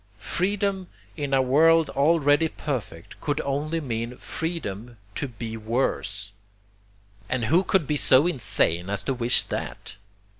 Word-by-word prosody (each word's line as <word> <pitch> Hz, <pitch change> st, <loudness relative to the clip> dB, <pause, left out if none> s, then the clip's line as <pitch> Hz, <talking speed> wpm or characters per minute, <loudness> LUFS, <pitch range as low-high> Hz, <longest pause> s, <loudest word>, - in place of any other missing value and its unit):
'Freedom' 190 Hz, -, -1 dB, 0.3 s
in 145 Hz, -2 st, -4 dB
a 135 Hz, -1 st, +3 dB
world 160 Hz, +4 st, +4 dB
already 145 Hz, +1 st, +3 dB
perfect 125 Hz, -, -6 dB
could 145 Hz, -1 st, -1 dB
only 150 Hz, +4 st, -2 dB
mean 120 Hz, -3 st, -4 dB
freedom 120 Hz, -, -5 dB, 0.2 s
to 140 Hz, -, -3 dB
BE 115 Hz, -2 st, -7 dB
WORSE, 110 Hz, -3 st, -2 dB, 1.0 s
and 125 Hz, -2 st, 0 dB
who 165 Hz, -, +3 dB
could 185 Hz, -3 st, +2 dB
be 150 Hz, +2 st, 0 dB
so 135 Hz, +1 st, +5 dB
insane 100 Hz, -, +1 dB
as 100 Hz, -1 st, -2 dB
to 135 Hz, -, -1 dB
wish 120 Hz, -1 st, +3 dB
that? -, -, -6 dB
135 Hz, 135 wpm, -25 LUFS, 115-160 Hz, 1.0 s, so